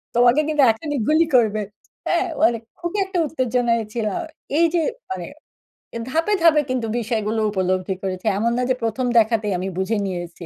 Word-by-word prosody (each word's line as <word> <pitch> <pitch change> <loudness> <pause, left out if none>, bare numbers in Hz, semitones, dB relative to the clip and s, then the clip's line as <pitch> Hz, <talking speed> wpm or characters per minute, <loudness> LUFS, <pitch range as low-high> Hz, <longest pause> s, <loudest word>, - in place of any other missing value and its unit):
তোমাকে 245 +4 +5
কিন্তু 305 -2 +2
এখনই 290 +5 -4
গুলি 315 +2 +4
করবে।” 215 -3 +3 0.5
হ্যাঁ? 350 +2 +2 0.2
মানে 240 -8 +4 0.2
খুবই 345 +4 -3
একটা 380 -1 -4
উত্তেজনায় 245 -5 0
ছিলাম। 235 +9 -2 0.4
এই 335 - +5
যে 340 - +2 0.3
মানে - - -4 0.7
এ - - -1
ধাপে, 330 +8 +1
ধাপে 310 -3 +6
কিন্তু 250 -3 -1
বিষয়গুলো 220 -1 -1
উপলব্ধি 185 -1 -1
করেছি। 185 0 -4
এমন 230 +3 +1
না - - +1
যে, 255 - +3
১ম 230 +3 -1
দেখাতেই 220 -2 +1
আমি 185 - -3
বুঝে 200 +4 0
নিয়েছি। 175 -1 -6
235 Hz, 165 wpm, -21 LUFS, 210-300 Hz, 0.7 s, ধাপে